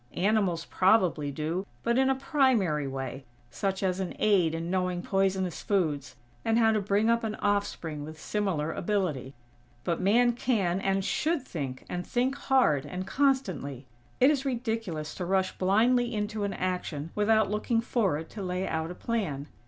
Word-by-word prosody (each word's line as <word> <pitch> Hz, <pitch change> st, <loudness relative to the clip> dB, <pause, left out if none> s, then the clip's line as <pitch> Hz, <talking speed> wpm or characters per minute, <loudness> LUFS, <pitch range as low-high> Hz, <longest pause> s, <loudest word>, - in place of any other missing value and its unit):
Animals 190 Hz, -4 st, +1 dB
probably 185 Hz, -7 st, +3 dB
do, 155 Hz, +6 st, -2 dB, 0.2 s
but 235 Hz, 0 st, +2 dB
in 265 Hz, 0 st, +3 dB
a 270 Hz, -, +3 dB
primary 240 Hz, -, +2 dB
way, 135 Hz, 0 st, -5 dB, 0.3 s
such 190 Hz, +9 st, -2 dB
as 185 Hz, -1 st, 0 dB
an 190 Hz, -2 st, -3 dB
aid 180 Hz, -7 st, +3 dB
in 165 Hz, +1 st, -3 dB
knowing 180 Hz, -1 st, 0 dB
poisonous 190 Hz, -2 st, 0 dB
foods, 155 Hz, -9 st, -1 dB, 0.3 s
and 225 Hz, 0 st, +2 dB
how 225 Hz, -1 st, +5 dB
to 215 Hz, -1 st, +1 dB
bring 200 Hz, +2 st, +1 dB
up 230 Hz, 0 st, +2 dB
an 215 Hz, -1 st, -2 dB
offspring 200 Hz, -7 st, -1 dB
with 155 Hz, +1 st, -9 dB
similar 175 Hz, -6 st, -1 dB
ability. 165 Hz, -10 st, -2 dB, 0.5 s
But 170 Hz, 0 st, -1 dB
Man 240 Hz, +6 st, +4 dB
can, 200 Hz, -7 st, 0 dB
and 195 Hz, 0 st, 0 dB
should 315 Hz, +2 st, 0 dB
think, 140 Hz, -, -5 dB
and 180 Hz, 0 st, -3 dB
think 250 Hz, +6 st, 0 dB
hard 260 Hz, -, +2 dB
and 180 Hz, +5 st, -5 dB
constantly. 185 Hz, -, 0 dB, 0.3 s
It 265 Hz, +3 st, +6 dB
is 280 Hz, -3 st, 0 dB
ridiculous 225 Hz, -, -3 dB
to 185 Hz, -, -5 dB
rush 190 Hz, +1 st, 0 dB
blindly 235 Hz, +5 st, +3 dB
into 210 Hz, 0 st, -2 dB
an 200 Hz, -, -2 dB
action 180 Hz, -4 st, -3 dB
without 220 Hz, 0 st, +3 dB
looking 220 Hz, +2 st, +1 dB
forward 195 Hz, -10 st, 0 dB
to 210 Hz, -, -7 dB
lay 180 Hz, 0 st, -2 dB
out 160 Hz, 0 st, -2 dB
a 180 Hz, -, -6 dB
plan. 170 Hz, -13 st, -3 dB
190 Hz, 165 wpm, -28 LUFS, 165-225 Hz, 0.5 s, It